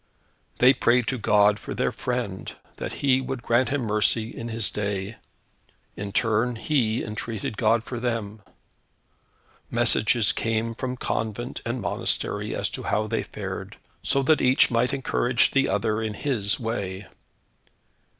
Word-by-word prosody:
They 130 +2 +6
prayed 125 -1 +3
to 130 - -2
God 105 0 +4
for - - -6
their - - 0
friend, - - -3 0.3
that - - -4
He 130 -1 +4
would 130 -2 -5
grant 120 +1 +2
him 145 0 0
mercy 110 +1 +1
in 115 - -5
His 115 -4 -1
day. 100 +1 -3 0.8
In 100 0 -5
turn, 115 +3 +1
he 115 -3 0
entreated 110 0 -4
God 115 +1 +2
for 120 0 -5
them. 110 -3 -3 1.3
Messages 110 -1 +3
came 115 0 -1
from 125 +2 -4
convent 115 +1 -3
and 120 +1 -2
monastery - - -1
as - - -1
to - - -4
how 105 +1 0
they 110 - -1
fared, - - -6 0.2
so 135 - +1
that 155 +3 +3
each 130 +1 +4
might 120 +2 +2
encourage 130 -3 +1
the 135 0 +2
other 110 -1 0
in 110 -1 -3
His 105 -6 0
way. 100 -5 -3
115 Hz, 145 wpm, -25 LUFS, 105-125 Hz, 1.3 s, They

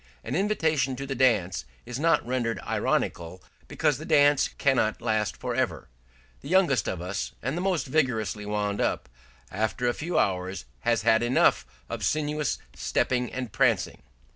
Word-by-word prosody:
An - - -5
invitation 160 -9 +1
to 135 +2 -5
the 135 - -3
dance 105 - +2 0.2
is 125 +2 -5
not 165 +2 +3
rendered 120 -4 -1
ironical 85 +2 -2 0.2
because - - 0
the - - -7
dance 145 -1 +4
cannot 130 -6 +1
last 110 -4 -1
for - - -3
ever; - - -2 0.5
the 140 - -9
youngest 175 - +3
of 90 - -4
us 95 +2 -4
and 135 +5 -1
the 175 - -2
most 185 -4 0
vigorously 125 -7 0
wound 105 0 -1
up, - - -1 0.4
after 110 +4 -1
a 120 - +2
few 165 +4 -3
hours, 95 - 0
has 115 - +1
had 115 0 +4
enough 120 - +3 0.2
of - - -5
sinuous 150 -1 0 0.2
stepping 125 -1 0
and 125 -4 -5
prancing. 115 -5 +1
125 Hz, 160 wpm, -27 LUFS, 105-145 Hz, 0.5 s, dance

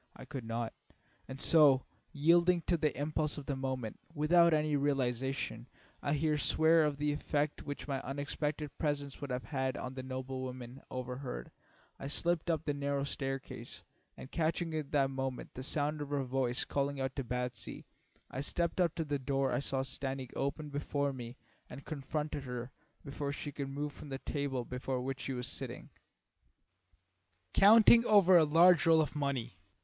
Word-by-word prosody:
I - - -10
could 130 -4 -6
not, 115 0 -3 0.5
and 130 0 -7
so, 145 -5 +6 0.3
yielding 170 +4 +4
to 175 - +2
the 155 -5 0
impulse 150 +1 -1
of 145 - -6
the 140 - -2
moment, 130 -4 -3 0.2
without 170 +3 +5
any 155 -1 +2
realisation, 130 -4 -1 0.3
I 145 - 0
here 150 0 +1
swear, 160 +5 +4
of 145 -2 -1
the 150 +1 +1
effect 145 0 -1
which 145 0 -5
my 135 -2 -2
unexpected 145 +2 -3
presence 145 -3 -2
would 140 - -4
have 125 +4 -4 0.2
on 125 - -5
the 130 - -5
noble 130 0 -5
woman 125 0 -7
overhead, 125 - -5 0.5
I - - -5
slipped 170 +3 0
up 160 -2 0
the 145 - 0
narrow 140 0 -1
staircase, 135 -1 -5 0.3
and 130 - -10
catching 165 0 0
at 155 -3 -3
that 135 -2 +2
moment 135 -1 -4
the 130 - -6
sound 150 +2 -1
of 145 - -4
her 145 -1 0
voice 125 -1 0
calling 140 0 -1
out 135 0 -2
to 135 - -1
Batsy, 125 0 -4 0.5
I 130 - -3
stepped 170 +5 -1
up 170 -3 +2
to 165 - -2
the 145 -1 -1
door 135 0 0
I 120 - +1
saw 135 -1 0
standing 135 -1 -5
open 145 +2 -2
before 145 0 -1
me 120 -1 -8 0.3
and 135 - -9
confronted 150 -1 -3
her 125 0 -5 0.3
before 140 0 -3
she 145 +1 -5
could 140 -1 -4
move 145 +1 -3
from 145 - -10
the 135 - -3
table 135 -3 -2
before 125 +1 -3
which 135 +2 -3
she 135 - -3
was 125 -1 -3
sitting, - - -6 1.6
counting 225 +3 +8
over 195 -3 +7
a 170 - +8
large 165 +2 +6
roll 165 -1 +7
of 155 - -2
money. 140 -9 -2
140 Hz, 175 wpm, -33 LUFS, 130-150 Hz, 1.6 s, counting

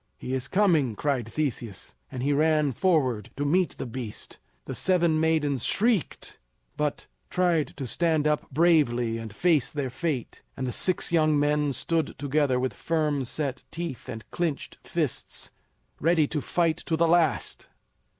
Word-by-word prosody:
"He 130 - -5
is 130 -1 -2
coming!" 160 - +2
cried 125 -3 -1
Theseus, 120 -9 -3 0.2
and 125 -1 -4
he 145 +1 +2
ran 150 -1 +2
forward 130 - +1
to 145 - -1
meet 180 +5 +1
the - - -4
beast. 120 -3 -6 0.3
The - - -5
seven 170 -4 +2
maidens 150 -5 +1
shrieked, 220 - 0 0.4
but 150 -1 -2 0.2
tried 175 -4 +1
to 135 - -4
stand 160 +3 +1
up 150 0 0
bravely 130 -8 +3
and 115 -1 -7
face 155 - +2
their 140 -4 -3
fate; 135 -2 -3 0.2
and 130 - -2
the 125 - -2
six 180 +8 +1
young 155 -3 +3
men 150 0 +2
stood 160 +5 -1
together 140 -2 +1
with 130 0 -1
firm 150 -4 0
set 140 +1 -3
teeth 165 -6 -6
and 115 -1 -6
clinched 165 -5 -3
fists, - - -3 0.5
ready 165 0 +3
to 150 - -2
fight 165 +2 +1
to 165 -2 -2
the 170 +1 +3
last. 160 -7 +1
150 Hz, 155 wpm, -27 LUFS, 130-165 Hz, 0.5 s, bravely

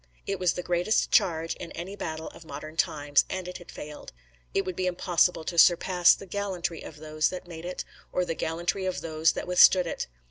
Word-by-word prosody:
It 195 -1 -2
was 180 -2 +2
the 180 - -5
greatest 180 +5 +1
charge 165 -2 +2
in 170 - -8
any 185 +4 -6
battle 160 -5 -5
of - - -14
modern 155 +1 -8
times, 145 -3 +2
and 185 -1 -4
it 180 - -7
had 175 - -14
failed. 150 0 -9 0.4
It 195 - 0
would 185 -1 -4
be 185 +1 -1
impossible 175 -1 +2
to 170 +1 -1
surpass 175 +1 +6
the - - -11
gallantry 185 -4 -3
of 150 - -10
those 155 0 0
that 185 -1 -7
made 165 -1 -8
it, 180 - -5 0.3
or 180 - 0
the 165 - -2
gallantry 175 +4 -2
of 185 - -2
those 160 0 +1
that - - -4
withstood 180 0 +6
it. 165 - -4
175 Hz, 210 wpm, -27 LUFS, 160-185 Hz, 0.4 s, surpass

